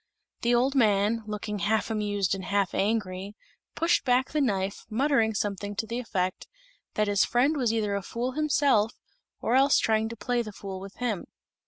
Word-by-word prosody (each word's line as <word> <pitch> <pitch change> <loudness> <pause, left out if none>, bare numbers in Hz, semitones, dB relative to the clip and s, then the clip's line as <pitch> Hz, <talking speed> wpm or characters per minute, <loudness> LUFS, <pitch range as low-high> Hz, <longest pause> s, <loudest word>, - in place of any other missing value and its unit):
The 240 +1 +3
old 255 +3 +2
man, 215 -3 +3
looking 210 0 -4
half 220 +2 0
amused 205 -3 0
and 190 -1 -4
half 200 -2 0
angry, 200 -1 -1 0.4
pushed 335 +1 +2
back 255 +1 +2
the 305 - +1
knife, 200 -6 -1
muttering 230 -2 +2
something 205 0 -2
to 220 - -2
the 230 +2 -3
effect 185 -6 -2 0.5
that 210 0 +1
his 205 -1 +3
friend 260 +6 +2
was 250 -6 +1
either 215 -3 0
a 200 - -1
fool 235 +6 -3
himself, 280 -6 +2 0.5
or 235 - 0
else 270 +2 +5
trying 220 0 +1
to 230 - -6
play 245 0 -1
the 215 -2 -6
fool 195 -1 -7
with 195 +1 -10
him. 230 -6 -2
220 Hz, 180 wpm, -27 LUFS, 200-245 Hz, 0.5 s, else